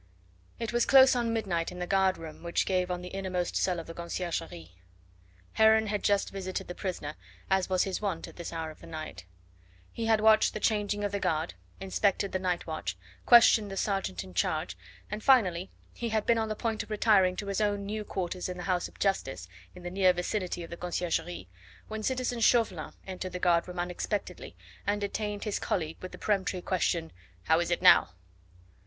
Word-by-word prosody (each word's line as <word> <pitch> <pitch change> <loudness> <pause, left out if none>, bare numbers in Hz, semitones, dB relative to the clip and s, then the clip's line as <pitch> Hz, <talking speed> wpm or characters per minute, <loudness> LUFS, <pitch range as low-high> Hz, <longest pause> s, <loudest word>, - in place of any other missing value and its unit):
It 230 0 -4
was 240 0 +2
close 265 -1 +7
on 235 -2 0
midnight 185 -8 -1
in 180 - -9
the 180 - -3
guard 190 0 +2
room 160 -1 -9
which 170 0 0
gave 185 -1 0
on 180 0 -3
the 180 - -6
innermost 185 -2 -2
cell 180 -2 +1
of 165 - -7
the 165 - -8
Conciergerie. 170 - -4 0.8
Heron 220 0 +5
had 210 -1 -2
just 200 -1 +2
visited 190 -1 -4
the 175 - -5
prisoner 175 -6 -4 0.4
as 190 -1 +2
was 185 -1 +3
his 195 0 -3
wont 190 -6 -2
at - - -13
this 170 - -6
hour 160 -1 -4
of 155 - -16
the - - -11
night. 155 - -7 0.7
He 230 -1 -3
had 220 -1 +4
watched 220 0 +5
the - - -2
changing 205 -1 0
of 205 - -1
the 200 - -1
guard, 160 -2 -1 0.3
inspected 195 +1 0
the 185 - -1
night 180 -2 -1
watch, 100 - -4 0.3
questioned 225 -3 +7
the 195 - -6
sergeant 195 - -1
in 95 - -12
charge, 85 - -1 0.4
and 210 +1 -3
finally 190 -9 +4 0.2
he 235 - -4
had 220 -1 0
been 230 -1 +3
on 220 -1 -1
the 215 - -2
point 225 0 -2
of - - -9
retiring 205 -4 +3
to 200 - -5
his 200 +1 -1
own 205 -1 0
new 210 +1 -3
quarters 185 -2 -3
in 180 - -5
the 175 - -6
house 180 -1 0
of - - -18
Justice, 95 - -1 0.3
in 180 - -11
the 175 - -5
near 185 -1 +4
vicinity 180 0 -2
of 165 - -10
the 170 - -6
Conciergerie, 170 - -2 0.4
when 220 0 -4
citizen 250 0 -1
Chauvelin 220 -8 +2
entered 185 -1 -6
the - - -2
guard 175 -1 +2
room 180 0 -8
unexpectedly 180 +4 -3 0.3
and 205 0 +1
detained 205 0 -3
his 210 -2 -2
colleague 160 -4 -2
with 185 - -7
the - - -9
peremptory 190 -3 -1
question: 170 -3 0 0.3
"How 160 +1 +3
is 170 - -1
it 175 +1 -1
now?" 90 - +6
185 Hz, 205 wpm, -29 LUFS, 175-210 Hz, 0.8 s, close